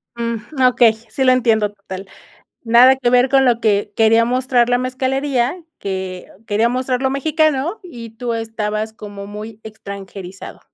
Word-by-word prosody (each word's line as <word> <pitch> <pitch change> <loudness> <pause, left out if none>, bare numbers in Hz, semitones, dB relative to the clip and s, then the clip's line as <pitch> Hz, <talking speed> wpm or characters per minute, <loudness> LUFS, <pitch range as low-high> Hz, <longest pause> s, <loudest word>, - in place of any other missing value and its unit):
Mm, 235 +4 -4
okey, 235 -2 +4 0.2
sí 265 - -2
lo 255 - +5
entiendo 225 -4 +2
total. 195 -1 -9 0.6
Nada 240 +3 +6
que 255 -2 0
ver 250 +1 +4
con 270 0 +4
lo 240 -2 +3
que 205 -2 +1
quería 225 +1 +4
mostrar 250 0 +1
la 245 - +3
mezcalería 260 +1 -1 0.2
que 190 -2 -5 0.2
quería 220 +2 +1
mostrar 255 0 -1
lo 265 - +1
mexicano 310 +5 0
y 235 -11 -10
tú 235 +1 -4
estabas 220 -1 -3
como 205 -2 -9
muy 210 +1 -9
extranjerizado. 200 -3 -9
235 Hz, 150 wpm, -18 LUFS, 210-255 Hz, 0.6 s, Nada